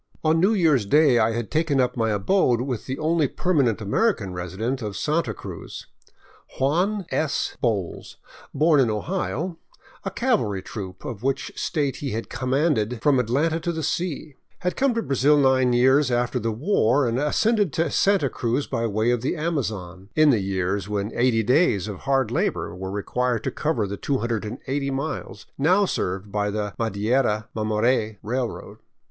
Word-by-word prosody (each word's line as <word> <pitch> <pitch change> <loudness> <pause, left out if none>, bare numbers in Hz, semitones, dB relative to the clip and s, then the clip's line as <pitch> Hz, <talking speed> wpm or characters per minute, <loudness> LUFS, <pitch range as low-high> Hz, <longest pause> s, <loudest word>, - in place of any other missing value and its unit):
On 160 +1 +3
New 195 +6 +4
Year's 150 - +3
Day 145 -1 +5
I 110 0 +2
had 115 -2 -4
taken 155 -3 +1
up 125 -1 +1
my 115 -2 0
abode 120 - +2
with 125 -3 -4
the 130 +1 -3
only 155 -1 +1
perma 165 -2 +1
nent 110 0 -3
American 105 - 0
resident 95 +9 -3
of 105 -3 -4
Santa 155 -5 0
Cruz. - - -8 0.4
" - - -24
Juan 180 +9 +1
" - - -25
S. 155 -2 -1
Bowles, 105 -8 -2 0.3
born 155 +1 +3
in 125 -4 +3
Ohio 170 - -3 0.2
— - - -26
a - - -2
cavalry 120 - 0
troop 95 -3 -8
of 110 -4 -6
which 135 +1 -1
state 145 -4 -1
he 140 -5 -4
had 115 +1 -5
commanded 125 -2 0
from 140 -3 +4
Atlanta 145 +8 +1
to 170 - -2
the 160 -1 -4
sea 160 -2 -2
— - - -41
had 180 - 0
come 270 -3 +1
to 230 - 0
Brazil 140 +2 +3
nine 130 -2 +3
years 130 +3 +4
after 120 +1 0
the 115 0 -1
war 130 - +2
and 120 +2 0
ascended 205 - +2
to 165 -2 0
Santa 195 -7 +3
Cruz 125 +2 -1
by 115 0 -1
way 110 +3 +1
of 120 -2 0
the 130 - -1
Amazon, 110 - -3
in 155 -1 +6
the 115 -6 +2
years 95 +1 -2
when 105 +1 -2
80 120 -2 +2
days 110 - +2
of 100 -3 -5
hard 135 -4 0
labor 120 - -1
were 95 +1 -5
required 115 +4 -1
to - - -2
cover 150 -9 -1
the 100 +1 -5
280 130 +3 -2
miles 140 +4 -4
now 185 +8 +4
served 95 - -3
by 105 0 0
the 105 -1 -3
Madeira 110 0 0
Mamore 110 0 0
railroad. 120 +3 -4
125 Hz, 175 wpm, -24 LUFS, 110-150 Hz, 0.4 s, in